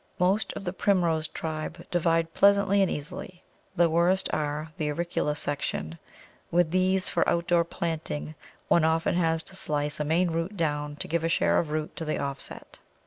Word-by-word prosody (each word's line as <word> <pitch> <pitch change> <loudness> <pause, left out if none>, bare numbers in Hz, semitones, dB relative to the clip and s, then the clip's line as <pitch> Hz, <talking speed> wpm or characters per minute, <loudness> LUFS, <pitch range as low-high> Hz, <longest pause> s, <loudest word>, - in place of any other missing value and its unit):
Most 190 +4 +2
of - - -6
the 180 -1 -3
Primrose 170 -6 +1
tribe 160 +2 -5
divide 165 -1 +1
pleasantly 200 0 +4
and 195 - +3
easily: 175 +4 -6 0.3
the 175 -1 +5
worst 175 +4 +2
are 150 +1 -2
the 150 -1 -2
auricula 150 -1 -1
section; 85 - -3 0.5
with 175 -2 +2
these, 185 +1 +2
for 170 - +1
outdoor 170 0 +2
planting, 160 - -4 0.3
one 170 - +4
often 160 +1 +2
has 165 -2 +1
to 190 - -10
slice 150 -4 -2
a - - +1
main 165 +3 +2
root 165 +5 -2
down 150 -3 -1
to - - -4
give 165 0 0
a 165 - +1
share - - +3
of 160 - -2
root 155 0 -3
to - - -3
the 155 - -1
offset. 140 -1 -6
165 Hz, 175 wpm, -27 LUFS, 155-175 Hz, 0.5 s, the